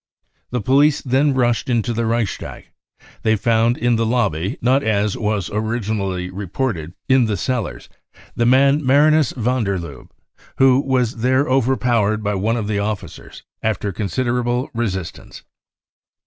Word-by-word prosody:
The 125 -1 -2
police 140 +5 +3
then 135 +2 +2
rushed 120 -2 +1
into 120 -1 0
the 115 0 -1
Reichstag. 115 -3 -3 0.5
They 110 0 +2
found 115 +3 +2
in 120 0 +1
the 115 - +1
lobby, 110 - -1
not, 130 +3 +2
as 105 -3 0
was 105 -4 -2
originally 105 -4 -2
reported, 95 - -4
in 130 -2 +4
the 105 -2 -1
cellars, 100 - -3 0.5
the 120 - +1
man 140 +4 +4
Marinus 145 +2 +4
van 125 +1 0
der 100 -2 -1
Lubbe, 80 -7 -9 0.5
who 130 -1 +5
was 130 -4 0
there 130 +5 +1
overpowered 120 -5 +1
by 105 0 -1
one 110 +4 0
of 110 -3 -3
the 105 -1 -1
officers 105 0 -6 0.2
after 105 -2 -1
consider 120 +6 -1
able 120 +1 -2
resistance." 95 -7 -5
115 Hz, 145 wpm, -19 LUFS, 105-130 Hz, 0.5 s, who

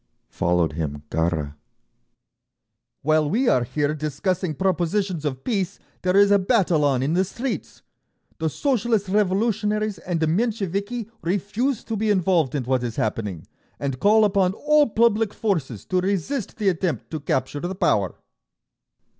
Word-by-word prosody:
Followed 85 -2 +1
him 75 -2 -4
Gharra: 80 -3 0 1.5
"While 155 0 +2
we 240 - +1
are 125 - +4
here 145 +4 -1
discussing 155 +3 -2
propositions 185 0 0
of 135 -2 -3
peace, 200 -5 -1 0.2
there 185 +1 +2
is 200 0 +6
a 200 - +6
battle 185 -6 +2
on 135 -3 +2
in 145 +4 0
the 185 +2 +3
streets…. 225 - -5 0.6
The 160 0 0
Socialist 230 - 0
Revolutionaries 210 +1 +1
and 175 -2 -2
the 160 - +2
Mensheviki 205 +4 -1
refuse 205 +8 -1
to 225 - -4
be 215 +1 0
involved 180 -8 +2
in 140 - -1
what 130 +1 0
is 115 -2 -3
happening, 105 -6 -2 0.3
and 135 -2 -3
call 215 +1 +5
upon 190 -2 +2
all 300 +3 +3
public 220 -1 +2
forces 160 - -2
to 185 -1 0
resist 200 - -2
the 210 -3 +2
attempt 170 - -2
to 155 - -3
capture 145 0 -1
the 175 +5 -4
power…." 100 - +1
185 Hz, 145 wpm, -23 LUFS, 145-210 Hz, 1.5 s, is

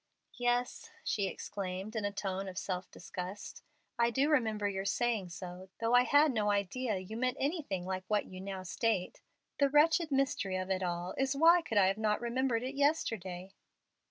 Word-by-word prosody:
"Yes," 245 0 0
she 200 -2 0
exclaimed, 190 +2 -5
in 215 -2 -1
a 205 - 0
tone 195 -1 -3
of 185 -2 -7
strong 190 - -2
self 185 - -20
disgust, 180 +3 -7 0.4
"I 235 0 +4
do 270 +5 +1
remember 220 -7 +2
your 195 -1 -2
saying 210 -1 0
so, 180 +2 -8
though 230 +1 +1
I 245 0 +6
had 290 +2 +5
no 215 -4 +1
idea 205 +3 0
you 185 +4 -7
meant 255 +3 0
anything 275 - -2
like 185 0 -3
what 210 -1 +1
you 185 0 -9
now 190 -1 -5
state. 190 0 -1 0.4
The 280 -1 +4
wretched 310 +2 +4
mystery 265 -9 +1
of 185 +1 -3
it 190 0 0
all 175 0 -2
is, 270 +1 +1
why 335 +3 +7
could 225 -10 -3
I 190 -1 +5
not 215 -1 +2
have - - -3
remembered 240 0 0
it 260 +2 -3
yesterday?" 195 - -1
210 Hz, 185 wpm, -33 LUFS, 190-255 Hz, 0.4 s, why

